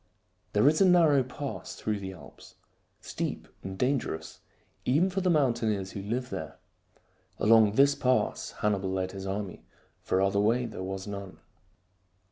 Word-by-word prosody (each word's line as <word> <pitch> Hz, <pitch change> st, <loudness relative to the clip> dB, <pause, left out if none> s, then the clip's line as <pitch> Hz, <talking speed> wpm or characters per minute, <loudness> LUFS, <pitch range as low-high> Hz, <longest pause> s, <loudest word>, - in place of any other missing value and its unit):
There 105 Hz, +6 st, +4 dB
is 155 Hz, +5 st, +4 dB
a -, -, +7 dB
narrow 165 Hz, -6 st, +5 dB
pass 130 Hz, +2 st, -6 dB
through 105 Hz, -1 st, -2 dB
the 95 Hz, -1 st, -6 dB
Alps, 95 Hz, -, -14 dB, 0.5 s
steep -, -, -4 dB
and 95 Hz, 0 st, -7 dB
dangerous 125 Hz, -, -2 dB, 0.4 s
even 160 Hz, +9 st, +2 dB
for 195 Hz, +1 st, -1 dB
the 185 Hz, -, +1 dB
mountaineers 115 Hz, -, +1 dB
who 100 Hz, -, -6 dB
live 120 Hz, +5 st, -3 dB
there. -, -, -6 dB, 0.8 s
Along 110 Hz, -1 st, +5 dB
this 140 Hz, +4 st, +5 dB
pass 130 Hz, -2 st, 0 dB
Hannibal 100 Hz, -2 st, +1 dB
led 95 Hz, 0 st, -2 dB
his 95 Hz, 0 st, -7 dB
army, 95 Hz, -1 st, -4 dB, 0.4 s
for 95 Hz, -, 0 dB
other 100 Hz, +1 st, +2 dB
way 115 Hz, +4 st, +2 dB
there 110 Hz, -5 st, -7 dB
was 95 Hz, 0 st, -4 dB
none. 100 Hz, -2 st, -7 dB
110 Hz, 150 wpm, -29 LUFS, 95-135 Hz, 0.8 s, a